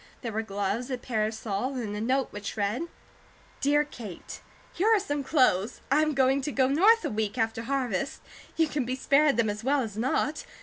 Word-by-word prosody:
There 230 - -3
were 220 +1 -1
gloves, 205 +3 -2
a 255 - -2
parasol, 220 +1 -2
and 220 -5 -3
a 210 - -3
note 260 +3 +1
which 205 0 -6
read: 210 +11 -1 0.7
DEAR 295 +1 +3
KATE: 225 - -9 0.3
Here 390 - 0
are 445 -2 +5
some 290 -7 -2
clothes. 250 - +2
I 295 +2 +5
am 310 -2 +1
going 270 +1 +3
to 295 - -3
go 260 -2 +2
North 420 +11 +5
a - - -1
week 215 +1 -2
after 225 -1 0
harvest. 260 -1 -2 0.4
You 325 -1 +3
can 290 -2 -1
be 250 +2 -2
spared 280 0 +3
then 235 -2 +3
as 210 +2 -7
well 280 +2 +2
as 215 -4 -5
not. 260 +5 0
255 Hz, 200 wpm, -28 LUFS, 220-285 Hz, 0.7 s, are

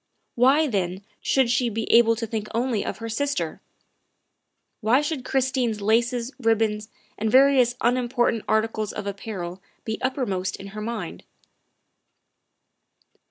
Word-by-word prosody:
Why, 270 +6 +4
then, 190 -6 -2 0.2
should 260 -3 +2
she 245 -1 +2
be 225 0 -3
able 230 -1 +6
to 230 +1 -3
think 215 -1 -4
only 235 -3 0
of - - -4
her 230 - -6
sister? 285 +5 -2 1.2
Why 235 +3 +3
should 295 -3 -2
Chris 265 0 0
tine's 240 -5 0
laces, 235 +4 +1
ribbons, 220 -2 +1 0.3
and 220 +1 0
various 260 -1 +5
unimportant 240 -1 +1
articles 220 -1 0
of 210 - -5
apparel 195 -3 -5 0.2
be 220 -1 -3
uppermost 225 -8 -1
in 195 - -9
her 215 +1 -7
mind? 230 +2 -5
230 Hz, 130 wpm, -24 LUFS, 215-255 Hz, 1.2 s, able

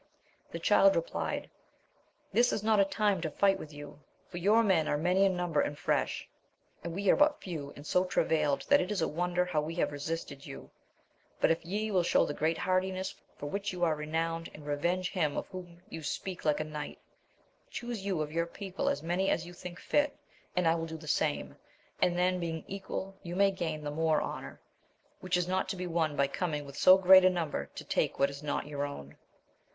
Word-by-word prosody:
The - - -4
Child 295 0 +5
replied. - - -2 0.9
This 245 +1 +4
is 210 - -2
not 215 -1 +3
a 200 - +6
time 200 -2 +1
to 160 - -1
fight 195 +4 +2
with 155 - -8
you: 145 0 -10 0.3
for 175 - -6
your 210 +6 +4
men 175 -7 +3
are 145 - +1
many 180 +5 +3
in 190 -2 +1
number 175 -4 +1
and 145 - -2
fresh, - - -1 0.6
and 170 0 -5
we 200 +1 -2
are - - +5
but 295 0 +3
few, 155 -6 -6
and 145 - -11
so 180 +4 +2
travailed, 155 -5 +1
that 285 - +6
it 180 - -3
is 205 -5 0
a - - +2
wonder 180 +2 0
how 165 -4 0
we 160 +2 -5
have 170 - 0
resisted 145 -1 -5
you; - - -10 0.7
but - - +4
if 165 - 0
ye 210 +5 -2
will 185 -3 +3
show 170 - +3
the - - -3
great 160 +2 0
hardiness 185 0 0 0.2
for - - -7
which 200 +7 -2
you 180 -1 -3
are 165 -2 +4
renowned, 165 +2 -2
and 150 - -11
revenge 175 +6 0
him 155 -6 0
of - - -2
whom 175 -2 -10
ye 165 - -7
speak 180 +4 -4
like 150 -1 +2
a - - 0
knight, 150 -1 -6 0.7
chuse 240 -4 -5
you 190 -6 0
of 150 - -7
your 170 +1 0
people 190 +2 -3
as 145 - -2
many 180 +4 +1
as 170 - 0
you 175 - -10
think 175 0 -9
fit, 290 0 +1 0.4
and 180 -2 +2
I 165 - +5
will 165 0 -2
do 160 0 -6
the 155 -1 -12
same, 150 0 0 0.5
and 175 -1 +3
then 180 0 +2
being 165 -2 -3
equal 195 0 -5
you 175 -1 -6
may 200 +1 +4
gain 160 -5 -3
the 145 - -3
more 160 0 +2
honour; - - -6 0.6
which 180 -1 0
is 180 -1 0
not 185 +1 0
to - - -2
be 180 0 -4
won 165 -3 0
by 140 - +3
coming 150 +1 -2
with 140 0 -10
so 185 +5 +7
great 190 0 +8
a 185 - +7
number 160 - -2
to - - -6
take - - 0
what 140 0 +3
is 140 +1 -9
not 150 -1 -2
your 145 -1 -3
own. 75 - -6
175 Hz, 220 wpm, -31 LUFS, 155-190 Hz, 0.9 s, great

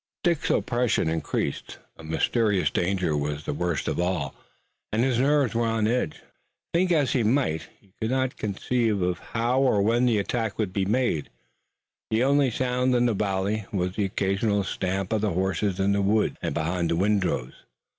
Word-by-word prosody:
Dick's 170 -4 +1
oppression 120 -7 +1
increased. 80 0 -2 0.2
A 80 - -13
mysterious 100 +5 +1
danger 90 -3 0
was 75 0 -2
the - - -2
worst 85 0 -2
of - - -1
all, 90 -6 -1 0.6
and 110 +2 +1
his 125 -2 +1
nerves 140 -2 +3
were 115 0 +1
on 115 -1 +1
edge. 115 -8 -1 0.5
Think 180 +2 +2
as 145 -6 +2
he 125 - +2
might, 110 - +1
he 95 -2 -28
could 110 - 0
not 130 0 0
conceive 110 +2 0 0.2
how 120 +3 0
or 125 -6 +3
where 115 +3 +2
the 120 -3 +3
attack 110 +1 -2
would 105 -4 -2
be 95 -1 0
made. 110 - 0 0.8
The 110 +2 +2
only 140 0 +3
sound 125 +1 0
in 120 0 +3
the 120 - +2
valley 100 0 -1
was 90 -1 -1
the 105 - 0
occasional 100 +2 0
stamp 95 +1 -2
of 110 - +1
the 105 -4 0
horses 95 +1 -1
in 95 +1 +2
the 100 0 +2
woods 105 +2 +2
and - - -2
behind 85 +1 -1
the 85 - +1
windrows. 95 -9 0
105 Hz, 175 wpm, -26 LUFS, 95-120 Hz, 0.8 s, nerves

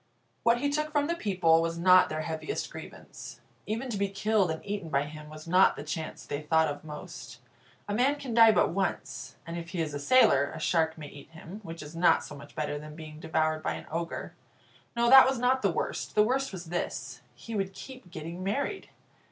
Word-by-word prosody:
What 235 +1 +3
he 285 0 +1
took 305 +1 -1
from 290 -1 +2
the 335 - 0
people 180 - +2
was 165 0 -2
not 185 +1 +6
their 155 0 -3
heaviest 160 - -4
grievance. - - -10 0.3
Even 230 +5 -2
to 210 - -2
be 200 0 +1
killed 200 -1 +1
and 160 0 -4
eaten 200 -5 -4
by 140 -2 +1
him 150 +1 -9
was 155 +1 -11
not 185 +3 +5
the - - -7
chance 155 +1 -5
they 145 +1 -4
thought 160 +1 +3
of 145 0 -5
most. 150 -1 -9 0.5
A 205 - -2
man 255 +6 +3
can 270 -5 -6
die 225 -1 +8
but 210 - +3
once; 130 -9 -3
and 170 +1 -5
if 170 0 -8
he 185 -2 -4
is 155 -3 -2
a 145 - -3
sailor, 145 - +4
a - - -6
shark 160 0 +1
may 150 -2 -8
eat 140 - -13
him, 165 +5 -10
which 165 -5 -8
is 150 +2 -10
not 175 +1 +4
so - - -9
much 140 - -13
better 145 -1 -2
than 150 0 -10
being 155 -1 -10
devoured 155 0 0
by - - -1
an - - -8
ogre. 165 +1 -4 0.6
No, 235 0 +2
that 265 +1 +9
was 265 - -1
not 255 +2 +2
the - - +2
worst. - - -3
The 210 - +6
worst 265 +5 0
was 180 -3 -7
this 175 - -4
he 230 - -9
would 195 -2 -1
keep 255 +1 -11
getting 170 +2 -7
married. 280 - -2
170 Hz, 220 wpm, -29 LUFS, 155-220 Hz, 0.6 s, that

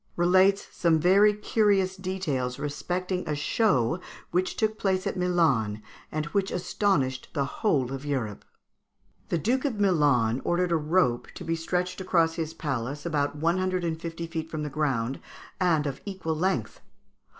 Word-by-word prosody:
relates 185 +3 +4
some 165 -3 +3
very 195 +5 +5
curious 205 -2 +1
details 180 -10 -2
respecting 180 +5 -2
a 150 - 0
show 150 - +1 0.3
which 185 +1 0
took 215 -1 0
place 190 -1 0
at - - -1
Milan, 155 - +1 0.3
and 155 0 -2
which 200 -1 +1
astonished 165 -8 0
the 140 - 0
whole 135 - 0
of 135 0 -5
Europe: 130 -8 -3 0.9
"The - - +1
Duke 245 +10 0
of 255 -8 -1
Milan 145 - +3
ordered 175 0 +1
a - - +4
rope 155 -5 +1
to - - -7
be 165 0 -1
stretched 180 +3 -2
across 165 -3 +2
his 165 -1 -4
palace, 140 -1 -3
about 145 -3 0
one 165 +5 +1
hundred 185 -1 0
and 165 -1 -2
fifty 165 0 -5
feet 165 -1 -5
from 155 -1 -4
the 150 - -4
ground, 135 -4 -1 0.4
and 165 -5 +2
of 140 -2 -4
equal 190 -5 -3
length. 185 +4 -1
165 Hz, 160 wpm, -27 LUFS, 145-185 Hz, 0.9 s, very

